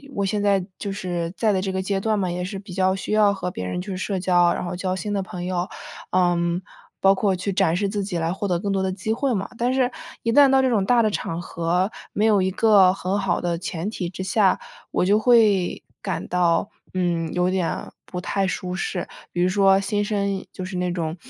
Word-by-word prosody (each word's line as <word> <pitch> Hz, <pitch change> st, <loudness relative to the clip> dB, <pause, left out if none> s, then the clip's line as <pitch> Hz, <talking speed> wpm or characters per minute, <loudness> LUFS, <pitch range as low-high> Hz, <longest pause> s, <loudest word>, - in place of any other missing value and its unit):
我 200 Hz, -, 0 dB
现 205 Hz, +1 st, -1 dB
在 200 Hz, -2 st, +2 dB
就 200 Hz, -, -3 dB
是 175 Hz, -3 st, -3 dB
在 220 Hz, -2 st, +2 dB
的 190 Hz, -, +1 dB
这 190 Hz, 0 st, -2 dB
个 190 Hz, 0 st, -1 dB
阶 195 Hz, 0 st, -1 dB
段 215 Hz, +2 st, 0 dB
嘛， 185 Hz, -3 st, -1 dB
也 180 Hz, +1 st, -3 dB
是 195 Hz, +2 st, -4 dB
比 195 Hz, -1 st, -10 dB
较 190 Hz, 0 st, +2 dB
需 195 Hz, -, -4 dB
要 210 Hz, -1 st, +5 dB
和 180 Hz, -2 st, -4 dB
别 90 Hz, -, -5 dB
人 90 Hz, -, -3 dB
去 190 Hz, +1 st, -5 dB
社 190 Hz, +1 st, -2 dB
交， 175 Hz, -1 st, +4 dB
然 -, -, -3 dB
后 175 Hz, +1 st, -4 dB
交 185 Hz, +1 st, -2 dB
新 205 Hz, +2 st, -3 dB
的 200 Hz, -, 0 dB
朋 180 Hz, -1 st, -6 dB
友， 180 Hz, 0 st, -1 dB, 0.4 s
嗯， 175 Hz, -1 st, +2 dB, 0.4 s
包 195 Hz, 0 st, +6 dB
括 195 Hz, 0 st, +1 dB
去 185 Hz, +2 st, -3 dB
展 185 Hz, -3 st, +2 dB
示 200 Hz, +2 st, 0 dB
自 205 Hz, 0 st, -2 dB
己 185 Hz, -3 st, -3 dB
来 165 Hz, 0 st, 0 dB
获 200 Hz, +2 st, -3 dB
得 180 Hz, -2 st, +1 dB
更 200 Hz, +2 st, -2 dB
多 195 Hz, -1 st, +1 dB
的 190 Hz, -, 0 dB
机 200 Hz, +3 st, -3 dB
会 255 Hz, +3 st, 0 dB
嘛， 195 Hz, -3 st, -2 dB
但 245 Hz, +2 st, +1 dB
是 255 Hz, -1 st, +2 dB, 0.3 s
一 230 Hz, -, +1 dB
旦 280 Hz, +2 st, +7 dB
到 265 Hz, 0 st, +5 dB
这 260 Hz, -, +2 dB
种 210 Hz, -5 st, +2 dB
大 240 Hz, +2 st, +4 dB
的 215 Hz, -, +2 dB
场 170 Hz, -4 st, -3 dB
合， 175 Hz, +3 st, -1 dB, 0.2 s
没 210 Hz, -, 0 dB
有 210 Hz, -3 st, +4 dB
一 190 Hz, 0 st, +1 dB
个 200 Hz, -2 st, +5 dB
很 195 Hz, +1 st, -2 dB
好 195 Hz, -3 st, 0 dB
的 175 Hz, -1 st, -1 dB
前 175 Hz, +1 st, -4 dB
提 190 Hz, -5 st, -4 dB
之 190 Hz, +1 st, -6 dB
下， 195 Hz, 0 st, +3 dB, 0.3 s
我 -, -, +1 dB
就 200 Hz, +3 st, +4 dB
会 215 Hz, -6 st, +3 dB, 0.2 s
感 -, -, -3 dB
到， 175 Hz, +1 st, +2 dB, 0.2 s
嗯， 175 Hz, -3 st, 0 dB
有 180 Hz, 0 st, +2 dB
点 185 Hz, -2 st, -2 dB, 0.2 s
不 180 Hz, -, -6 dB
太 195 Hz, +2 st, -1 dB
舒 180 Hz, 0 st, -3 dB
适， 185 Hz, -1 st, -3 dB, 0.2 s
比 175 Hz, -, -1 dB
如 180 Hz, -, +4 dB
说 195 Hz, 0 st, +4 dB
新 205 Hz, +1 st, -1 dB
生 200 Hz, -2 st, -1 dB
就 185 Hz, -, -6 dB
是 185 Hz, +1 st, -6 dB
那 180 Hz, 0 st, -1 dB
种 165 Hz, -2 st, -2 dB
190 Hz, 255 characters per minute, -23 LUFS, 180-205 Hz, 0.4 s, 旦